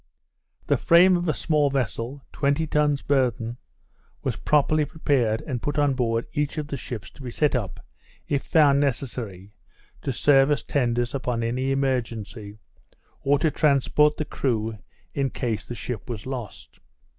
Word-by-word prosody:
The - - +2
frame 180 +1 +6
of 175 0 -1
a 155 - +2
small 150 -3 +2
vessel, 135 0 -3
twenty 140 +3 +1
tons 150 -2 +1
burthen, 120 -4 0 0.7
was - - -1
properly 150 +1 +2
prepared, 130 -8 0
and 125 -5 -3
put 145 - -2
on 145 -2 +3
board 115 -3 0
each 150 0 -1
of 150 -1 -3
the 140 - -3
ships 115 -7 -7
to - - -15
be 130 - -5
set 150 +5 +1
up 110 -8 -3 0.4
(if 140 -2 0
found 145 -3 +4
necessary) 115 -8 -3 0.5
to 135 - -2
serve 135 +2 +4
as 145 -2 +1
tenders 120 -3 0
upon 125 -4 -2
any 125 +3 -1
emergency, 115 -6 -2 0.6
or 140 +1 +3
to 155 +2 +1
transport 150 +1 +3
the 155 - -2
crew, 110 -6 -2 0.3
in 140 -1 0
case 115 -4 -3
the 120 - -5
ship 115 -3 -6
was 110 -4 -5
lost. 125 -5 -7
135 Hz, 155 wpm, -25 LUFS, 115-145 Hz, 0.7 s, frame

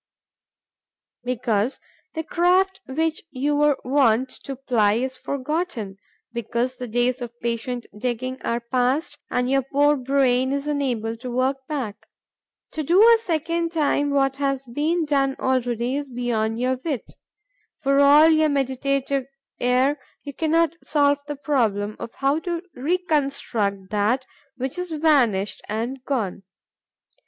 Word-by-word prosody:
Because 245 -1 0 0.4
the 320 - -2
craft 370 +4 +2
which 315 +4 -1
you 290 +2 -1
were 295 -1 +3
wont 255 -2 +3 0.2
to 275 - -4
ply 240 -6 +2
is 260 +4 -1
forgotten; 275 - -3 0.4
because 235 +2 -2
the 250 - -5
days 245 +3 0
of 240 0 -7
patient 235 +1 -3
digging 250 +3 -3
are 235 +1 -1
past 260 +6 0
and 250 0 0
your 270 +1 +3
poor 290 +3 +3
brain 260 -1 +2
is 280 0 -2
unable 250 -7 -1
to 250 +2 -7
work 255 +2 +1
back. 240 -8 -4 0.6
To 315 - -3
do 340 +6 +3
a 460 +2 +8
second 335 -3 -1
time 290 -2 +1
what 270 -1 +1
has 275 -1 -1
been 310 +7 0
done 275 -2 +1
already 245 0 0
is 285 -1 -5
beyond 235 -2 -1
your 255 +1 +1
wit. 290 -8 -3 0.7
For 275 0 +3
all 290 +2 +7
your 315 -1 +4
meditative 275 0 0 0.3
air, 255 +4 +2 0.2
you 285 - -7
cannot 325 +2 +2
solve 285 -1 +2
the 295 - -3
problem 220 -8 0
of 235 - -6
how 275 +3 +1
to 345 0 -3
reconstruct 275 - -1
that 215 +6 +1 0.3
which 260 +6 -3
is 360 0 -3
vanished 275 -11 +2
and 240 +5 -3
gone. 225 -10 -2
270 Hz, 135 wpm, -23 LUFS, 245-295 Hz, 0.7 s, a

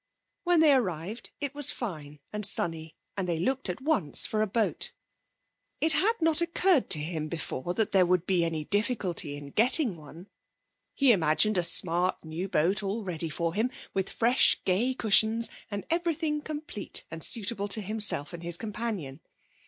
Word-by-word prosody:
When 350 -2 +4
they 305 -3 +6
arrived 195 - -2
it 285 -1 -4
was 290 -1 -1
fine 150 - -6
and 210 0 -4
sunny, 165 -5 +2 0.2
and 190 -2 -3
they 170 - 0
looked 265 +5 -1
at 180 - -5
once 270 - +1
for 215 - -1
a 215 - +1
boat. 220 +2 -1 0.9
It 320 0 +3
had 415 +9 +2
not 325 0 +3
occurred 340 -2 +2
to 150 - +5
him 155 0 -4
before 160 0 -4
that 220 - 0
there 185 -2 +4
would 180 -1 +1
be 180 -2 +1
any 160 -2 -3
difficulty 205 - -1
in 145 -1 -10
getting 245 - +3
one. 160 +4 -13 0.7
He 275 -3 +5
imagined 185 +2 +2
a - - +3
smart 175 +1 +1
new 165 +5 -5
boat 185 +3 +1
all 205 +3 -3
ready 170 -3 -3
for 165 +2 -2
him, 220 +6 0 0.2
with 190 -1 -2
fresh, 240 +3 +3
gay 230 +8 +1
cushions, 220 0 +3 0.2
and 205 -2 -5
everything 330 -3 -1
complete 295 - -3
and 165 0 -6
suitable 205 -3 +2
to 205 +2 +2
himself 205 -7 +1
and 170 - -8
his 170 0 +1
companion. 210 -10 -5
200 Hz, 170 wpm, -28 LUFS, 170-245 Hz, 0.9 s, they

